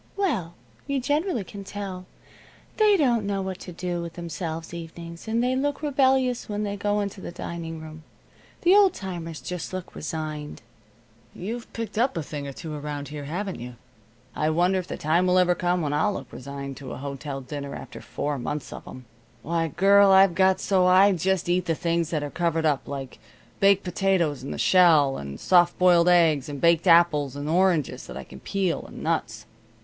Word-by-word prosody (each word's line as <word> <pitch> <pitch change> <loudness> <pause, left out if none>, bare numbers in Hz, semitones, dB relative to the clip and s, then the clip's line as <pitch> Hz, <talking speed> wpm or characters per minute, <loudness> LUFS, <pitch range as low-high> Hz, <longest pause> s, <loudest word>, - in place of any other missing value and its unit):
"Well, 225 - -1 0.3
you 280 -1 0
generally 290 - 0
can 200 +2 -9
tell. 190 -2 -6 0.7
They 425 -2 +5
don't 245 - +2
know 200 -1 -2
what 190 -1 -5
to 180 - -9
do 175 0 -3
with 170 -1 -6
themselves 165 -1 -5
evenings, 170 +2 -9
and 230 +2 +1
they 255 +1 +1
look 285 +3 -1
rebellious 265 -4 +2
when 210 0 -2
they 200 -1 -2
go 205 +1 0
into 200 -1 -5
the - - -6
dining 165 -2 -6
room. 155 0 -10 0.6
The 355 +1 +5
old 400 -3 +5
timers 170 -4 -6
just 180 0 -6
look 185 -1 -6
resigned." 155 -3 -5 0.7
"You've 230 +6 -6
picked 225 -2 -4
up 250 -4 +1
a 165 - -2
thing 145 -1 -6
or - - -5
two 155 +3 -7
around 145 -2 -5
here, 145 -1 -7
haven't 185 +6 -4
you? 120 +1 -8 0.6
I 155 - +1
wonder 180 +4 +2
if 180 - -6
the - - -5
time 170 +4 +2
will 180 0 +3
ever 180 -1 +4
come 175 -1 0
when 145 -1 -1
I'll 210 +7 +1
look 130 -7 -8
resigned 140 0 -7
to 135 -2 -7
a - - -7
hotel 140 0 -5
dinner, 140 +1 -6
after - - -9
four 145 -1 -3
months 145 +3 -4
of - - -10
'em. 130 -1 -10 0.4
Why, 165 +1 0
girl, 195 +5 +5
I've 190 -1 +6
got 190 +1 +3
so 185 -2 +2
I 190 +2 +6
just 185 0 0
eat 180 0 +1
the 165 -2 0
things 170 -1 -1
that 155 -3 -1
are 145 - -5
covered 165 -2 0
up 145 -3 +1
like 135 -3 -6 0.4
baked 200 0 +4
potatoes 180 -6 0
in 135 - -7
the - - -5
shell, 160 -7 +5
and 70 0 -7
soft 175 -1 +4
boiled 180 -1 +5
eggs, 160 -6 +4
and 145 -1 -5
baked 170 +2 +3
apples, 165 -5 +4
and 145 +1 -5
oranges 170 -2 +1
that - - -8
I - - -6
can 65 - -13
peel, 190 -4 -1
and - - -10
nuts." - - -2
175 Hz, 195 wpm, -25 LUFS, 150-195 Hz, 0.7 s, I've